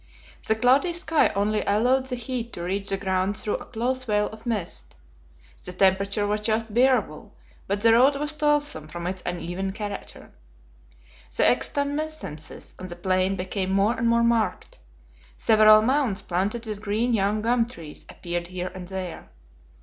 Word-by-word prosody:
The 220 - +3
cloudy 260 +9 +3
sky 335 -2 +2
only 210 +2 +1
allowed 250 +6 +2
the 255 - -3
heat 240 -1 -4
to 170 - -5
reach 195 +3 -3
the 195 - -1
ground 190 +1 -1
through 210 - -1
a - - -10
close 250 +2 -2
veil 210 -2 +1
of 220 +2 -12
mist. 210 -7 -4 0.7
The 180 - -6
temperature 195 +2 +2
was 210 +1 -1
just 220 0 -1
bearable, 220 - +1 0.3
but 200 +1 -1
the 225 +1 +5
road 260 +5 +5
was 295 +2 -1
toilsome 295 - 0
from 170 +2 -7
its 185 +1 -3
uneven 175 +3 -3
character. 205 -1 -7 1.1
The - - +3
extumescences 285 - -2
on 185 - -6
the 175 - -7
plain 185 +2 +1
became 185 +1 -3
more 200 +4 +3
and 230 0 -1
more 235 0 +3
marked. 235 -2 0 0.6
Several 215 -1 +6
mounds 255 -5 +1
planted 200 +7 -2
with 210 -2 -5
green 220 +4 0
young 210 0 +1
gum 235 0 +2
trees 165 -10 -10
appeared 175 0 -4
here 185 0 -5
and 185 -1 -8
there. 185 -2 -6
210 Hz, 160 wpm, -25 LUFS, 190-240 Hz, 1.1 s, Several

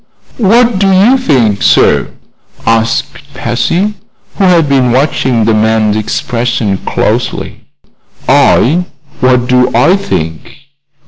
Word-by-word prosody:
"What 230 0 +2
do 195 -1 +2
you 200 +8 +4
think, 125 - 0
sir?" - - +2 0.6
asked 115 +5 -2
Patsy, 170 - -1 0.4
who 195 - +1
had 170 -4 +3
been 130 -3 +1
watching 130 -3 0
the 115 - +2
man's 110 -1 +1
expression 115 -1 -2
closely. - - -3 0.6
"I? 170 +9 +2 0.3
What 125 -1 +2
do 125 0 +2
I 125 +10 +3
think? 80 - -5
125 Hz, 110 wpm, -10 LUFS, 115-180 Hz, 0.6 s, you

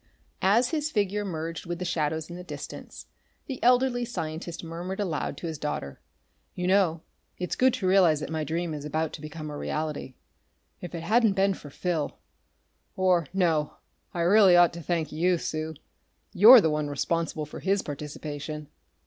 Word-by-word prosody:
As 230 +6 +4
his 305 -2 -1
figure 205 -5 0
merged 165 -2 -5
with 175 0 -3
the 180 - -4
shadows 160 -2 -1
in 175 - -8
the 180 - -8
distance, 180 - -8 0.4
the 265 -4 -6
elderly 250 0 +3
scientist 170 -6 -5
murmured 175 +4 -5
aloud 175 -7 -2
to - - -7
his 160 -3 -4
daughter: 70 - -4 0.5
"You 180 - -3
know, 180 -4 +2 0.3
it's 180 -1 -3
good 260 +1 +4
to 185 - -2
realize 180 -5 +5
that 155 - -5
my 160 -1 -1
dream 165 +2 -2
is 150 -1 -6
about 155 +1 -2
to 150 - -8
become 155 0 -7
a - - -6
reality. 150 -4 -4 0.7
If 175 -1 -7
it 165 - -5
hadn't 220 +3 +3
been 195 0 +2
for 150 - -11
Phil.... 165 0 -2 0.8
Or 180 -4 +2
no 165 -5 +1 0.4
I 170 - -3
really 190 +1 +6
ought 175 -1 +6
to 170 - -7
thank 165 -2 -2
you, 175 +3 +2
Sue. 160 -1 -4 0.6
You're 220 +5 +10
the 160 - +2
one 150 -1 -1
responsible 155 +2 -2
for 150 - -9
his 195 +1 +1
participation!" 150 0 -6
170 Hz, 175 wpm, -27 LUFS, 155-190 Hz, 0.8 s, You're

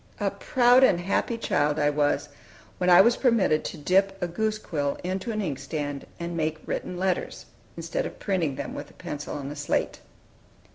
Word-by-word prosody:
A - - 0
proud 250 +1 +4
and 180 -9 +5
happy 195 +6 0
child 150 -9 +1
I 145 -1 +2
was, 145 0 0 0.5
when 180 - +2
I 175 +1 +9
was 235 +4 +4
permitted 220 - +3
to - - -5
dip 195 +5 +2
a 180 - -1
goose 215 +5 -1
quill 145 -8 -2
into 185 +5 -3
an 215 -1 -2
inkstand, 145 -2 -4
and 170 0 -4
make 160 -1 -1
written 180 - -4
letters, 185 0 -2 0.3
instead - - -2
of - - -11
printing 175 -9 -1
them - - -5
with 145 0 -7
a - - -19
pencil 150 0 -6
on 140 -1 -5
a - - -6
slate. 145 0 -1
175 Hz, 185 wpm, -26 LUFS, 145-195 Hz, 0.5 s, I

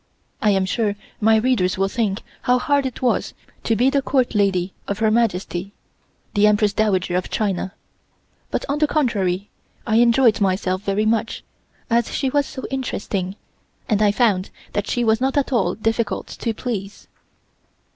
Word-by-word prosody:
I 215 - +3
am 195 -2 +2
sure 205 +1 0 0.2
my 220 +1 +4
readers 220 -6 +2
will 195 +1 +2
think 205 -1 -1 0.2
how 250 0 +3
hard 280 +2 +1
it 260 0 -8
was 250 - 0 0.3
to 225 - +2
be 250 +4 +3
the 280 -1 +2
Court 260 -2 +1
lady 195 -3 +1
of 200 - -2
Her 220 0 +2
Majesty, 195 -4 0 0.6
the 205 +1 +4
Empress 210 0 +3
Dowager 190 -4 +1
of 180 - -1
China, 195 -3 -1 0.8
but - - -2
on 285 +1 -1
the 300 - +3
contrary 205 - 0 0.3
I 220 -1 +2
enjoyed 235 -1 +4
myself 185 -1 0
very 205 +1 0
much, 220 0 0 0.4
as 235 -1 +1
she 270 -2 0
was 285 0 +1
so 260 -2 -8
interesting, 200 -7 -3 0.5
and 215 -2 +1
I 210 -1 +5
found 205 -4 +1 0.2
that 205 - -1
she 245 - 0
was 220 +1 +2
not 265 +2 +1
at 275 -1 +1
all 190 -7 +1
difficult 225 0 -1
to 230 - -3
please. 210 -4 -5
215 Hz, 165 wpm, -21 LUFS, 195-245 Hz, 0.8 s, I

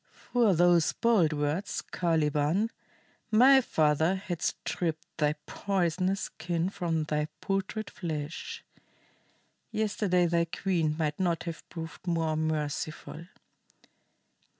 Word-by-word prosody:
"For 230 -6 +4
those 175 -1 +4
bold 215 -9 +3
words, 150 +6 -1
Caliban, 160 +4 +1 0.6
my 260 +5 +7
father 160 - +2
had 185 -4 -5
stripped 160 -3 -2
thy 150 -1 +2
poisonous 190 0 0
skin 170 +1 -2
from 165 -5 -1
thy 150 0 -1
putrid 195 +2 -2
flesh. 155 -2 -5 1.1
Yesterday 210 -5 +1
thy 170 0 +2
queen 165 -3 0
might 150 -2 -1
not 175 -3 +1
have 170 -2 -7
proved 165 +2 -8
more 165 -2 +1
merciful. 155 +1 -3
170 Hz, 105 wpm, -29 LUFS, 155-190 Hz, 1.1 s, my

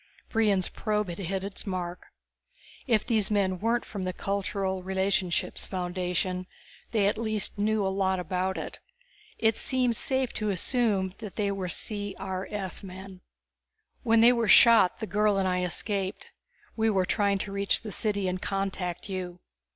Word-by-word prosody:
Brion's 210 -5 +2
probe 210 -3 -1
had 170 - -6
hit 190 +1 -2
its 200 +1 -4
mark. 180 -2 -4 0.8
If 225 -4 +2
these 220 -5 +1
men 190 -3 +1
weren't 230 +3 +1
from 200 -4 -5
the 185 0 -2
Cultural 195 0 -2
Relationships 190 -1 -1
Foundation 180 0 -2 0.4
they 215 -4 +2
at 205 - +1
least 215 -2 -2
knew 215 0 +2
a - - +2
lot 190 -1 +1
about 185 +2 -1
it. - - -6 0.6
It 220 -1 +2
seemed 255 -3 +1
safe 260 +1 +1
to 215 -1 -2
assume 200 -1 +1
they 210 -1 -2
were 190 -2 -3
C.R.F. 195 -1 -3
men. 190 0 -10 0.8
"When 230 -2 +4
they 240 +2 +8
were 235 -2 0
shot 225 -3 +7
the - - -1
girl 210 -1 +2
and 190 -1 +1
I 180 0 +1
escaped. 190 +2 -2 0.4
We 225 0 +2
were 190 -3 +2
trying 200 0 +2
to 195 +1 -4
reach 200 0 +1
the 215 - -6
city 205 -1 -1
and 180 0 -2
contact 195 -2 -3
you. 180 -2 -5
195 Hz, 155 wpm, -28 LUFS, 185-215 Hz, 0.8 s, they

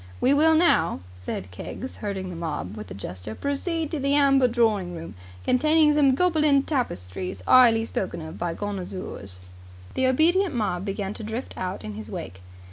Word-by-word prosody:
"We 265 - +4
will 320 +2 +5
now," 170 - +3
said 90 0 -6
Keggs, 255 - -7
herding 195 -3 -4
the - - -7
mob 150 - -4
with 105 -3 -8
a 95 - -7
gesture, 95 +2 -7
"proceed 315 +3 -2
to 315 - -2
the 275 +1 +1
Amber 275 -3 +5
Drawing 215 -7 +1
Room, 165 0 -8 0.3
containing 305 +3 +4
some 280 -3 +4
Gobelin 305 -5 +3
Tapestries 185 - -3
'ighly 230 -3 +6
spoken 190 -5 -3
of 160 0 -8
by 170 -1 -2
connoozers." 185 - -6 0.5
The 260 - +2
obedient 330 +5 +3
mob 195 -5 -1
began 195 0 -3
to 220 - -8
drift 220 +4 -5
out 185 - -4
in 105 0 -6
his 105 +1 -7
wake. 95 -2 -7
215 Hz, 170 wpm, -25 LUFS, -, 0.5 s, ighly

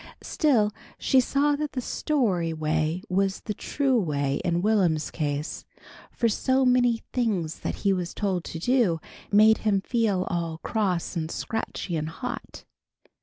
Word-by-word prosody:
Still, 235 -10 +2 0.3
she 265 - +3
saw 285 +3 +2
that 300 0 -3
the 255 - -2
story 210 - 0
way 155 +2 -1
was 195 +1 0
the 210 - -4
true 265 +3 0
way 145 -6 -1
in 175 -1 0
Will'm's 185 -8 +2
case, 150 -1 -3 0.5
for 235 - +1
so 260 +4 +2
many 245 -2 +3
things 195 -10 -1
that - - -3
he 195 - +5
was 180 -2 -3
told 190 -4 -1
to - - -6
do, 210 -3 +2 0.3
made 215 +2 +6
him 205 -3 +2
feel 210 -4 +1
all 170 -3 -3
"cross 190 -5 -1
and 160 -2 -2
scratchy 210 -3 -3
and 155 0 -2
hot." 250 +9 -7
195 Hz, 150 wpm, -26 LUFS, 165-240 Hz, 0.5 s, made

